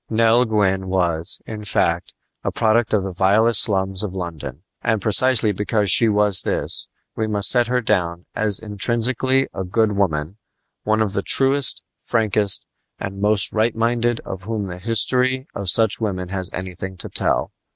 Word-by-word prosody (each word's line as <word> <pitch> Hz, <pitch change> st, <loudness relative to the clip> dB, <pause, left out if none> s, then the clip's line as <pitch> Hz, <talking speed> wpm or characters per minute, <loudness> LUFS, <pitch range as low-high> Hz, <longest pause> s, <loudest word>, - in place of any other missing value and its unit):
Nell 115 Hz, +2 st, +3 dB
Gwyn 95 Hz, -4 st, 0 dB
was, 85 Hz, -3 st, -2 dB
in 105 Hz, -1 st, -8 dB
fact, 85 Hz, -4 st, -1 dB, 0.3 s
a -, -, -2 dB
product 110 Hz, 0 st, +1 dB
of 105 Hz, -3 st, +1 dB
the 95 Hz, -1 st, -5 dB
vilest 100 Hz, +4 st, +4 dB
slums 95 Hz, -2 st, +2 dB
of 100 Hz, -3 st, -4 dB
London; 80 Hz, -5 st, -7 dB, 0.2 s
and 110 Hz, -1 st, 0 dB
precisely 110 Hz, +2 st, +3 dB
because 105 Hz, 0 st, 0 dB
she 110 Hz, +7 st, +6 dB
was 105 Hz, -2 st, +3 dB
this -, -, -1 dB, 0.3 s
we 110 Hz, -, -2 dB
must 105 Hz, -1 st, +3 dB
set 120 Hz, -2 st, +2 dB
her 125 Hz, +1 st, 0 dB
down 90 Hz, -6 st, -1 dB
as 105 Hz, -2 st, +1 dB
intrinsically 120 Hz, +5 st, 0 dB
a 95 Hz, -, -4 dB
good 105 Hz, +4 st, 0 dB
woman 90 Hz, -3 st, -2 dB, 0.4 s
one 110 Hz, +1 st, +1 dB
of 100 Hz, -3 st, -4 dB
the 100 Hz, -, -1 dB
truest, 135 Hz, +4 st, +3 dB, 0.2 s
frankest, 105 Hz, -3 st, 0 dB, 0.3 s
and 100 Hz, 0 st, -6 dB
most 105 Hz, 0 st, +1 dB
right 110 Hz, +1 st, 0 dB
minded 115 Hz, +1 st, 0 dB
of 95 Hz, -, -8 dB
whom 105 Hz, +1 st, -4 dB
the 90 Hz, -2 st, -8 dB
history 125 Hz, +5 st, +1 dB
of 100 Hz, -2 st, -3 dB
such 110 Hz, +3 st, +3 dB
women 90 Hz, -4 st, -3 dB
has 95 Hz, -2 st, +1 dB
anything 95 Hz, 0 st, -7 dB
to -, -, -7 dB
tell. -, -, 0 dB
105 Hz, 165 wpm, -20 LUFS, 95-115 Hz, 0.4 s, she